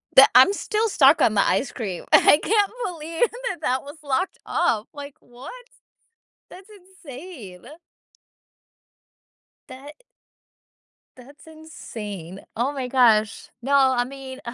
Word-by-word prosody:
The - - +9
I'm 395 - +7
still 435 +2 -2
stuck 285 -4 +4
on 225 - +3
the 200 - +2
ice 265 - 0
cream. 195 -7 -6
I 295 - +6
can't 415 -2 +1
believe 330 +4 -2 0.2
that 370 - -5
that 260 -3 -1
was 285 +3 -12
locked 280 +5 -2
up, 215 -1 -1
like, 285 -1 -10
what? 265 - -13 0.8
That's 380 +3 -15
insane. 335 - -13 2.0
That 265 +2 -11
i - - -41 1.1
That's 280 +5 -17
insane, 210 - -10
oh 245 +5 -1
my 265 -3 -5
gosh, 225 -4 +2
no, 275 +3 -2
I 260 -3 +3
mean, 265 0 -10
275 Hz, 125 wpm, -22 LUFS, 245-330 Hz, 2.0 s, The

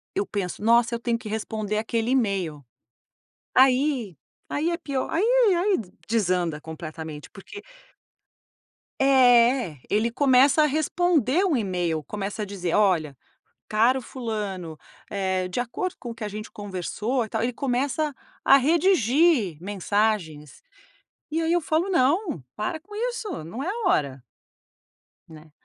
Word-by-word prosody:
eu 395 - 0
penso: 200 - -4
"Nossa 235 +1 +4
eu - - -4
tenho 235 -1 -1
que 230 -1 -10
responder 215 -1 -3
aquele 225 +2 -1
email." 190 - -1 0.9
Aí 255 - +3 0.3
aí 310 +4 0
é 345 - 0
pior 280 -6 -3
aí 340 - 0 0.3
aí 375 +3 +2 0.3
desanda 180 -8 0
completamente 160 -1 -8
porque 400 - -11 1.4
É 245 - +4
ele 220 +3 +1
começa 270 +3 +4
a 300 - +4
responder 315 - +1
o 335 -8 +2
email, 175 -7 -1
começa 205 +4 -4
a - - -3
dizer: 185 -4 -3
"Olha 170 -9 +2 0.5
caro 235 +5 +3
fulano, 210 -10 -5 0.3
eh, 190 -2 -1
de 180 - -3
acordo 265 +10 -3
com 240 - -7
o 230 - -7
que 230 - -8
a - - -2
gente 210 +1 -7
conversou, 205 +5 -3
e 220 - -8
tal." 220 +1 -2
Ele 245 +1 -1
começa 275 +4 -1 0.3
a 275 - +7
redigir 295 - +3
mensagens. 195 -6 -2 0.7
E 325 +2 0
aí 325 +1 0
eu 350 - +3
falo: 325 +4 0
"Não, 330 - +1 0.2
para 215 +9 -3
com 415 +6 -16 0.2
isso, 430 - -5
não 220 - -6
é - - -4
a 425 +1 -2
hora." 135 -3 0 1.1
Né? 155 -1 -14
230 Hz, 140 wpm, -25 LUFS, 190-280 Hz, 1.4 s, a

